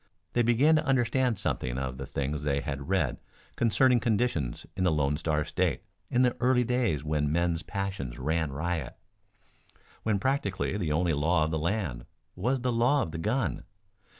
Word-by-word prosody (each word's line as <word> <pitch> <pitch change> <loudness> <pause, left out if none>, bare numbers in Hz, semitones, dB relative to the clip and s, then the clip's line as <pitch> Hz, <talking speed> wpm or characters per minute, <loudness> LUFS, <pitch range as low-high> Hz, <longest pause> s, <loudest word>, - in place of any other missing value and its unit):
They 120 - +3
began 120 +7 +4
to 155 - +1
understand 130 -3 +2
something 65 -7 -2
of 65 -1 -4
the 70 - -5
things 70 +2 -2
they 70 -1 0
had 70 +1 -5
read 85 -10 +1 0.4
concerning 120 +2 +4
conditions 110 - 0
in 95 - -1
the 90 - +3
Lone 75 -2 +1
Star 75 -1 0
State - - -1 0.3
in 125 +1 +3
the 125 -1 +2
early 125 0 +3
days 120 - 0
when 75 -1 0
men's 85 0 +1
passions 95 - -4
ran 80 -1 -1
riot; 80 0 -3 1.0
when 110 -2 +1
practically 100 -5 -1
the 90 -7 -1
only 85 +2 +2
law 80 +3 +2
of 80 - -1
the 80 - 0
land 80 - -2 0.3
was 125 +8 0
the 125 0 0
law 125 +5 +3
of 80 - -5
the 80 - -5
gun. 110 +10 -1
90 Hz, 175 wpm, -28 LUFS, 75-120 Hz, 1.0 s, began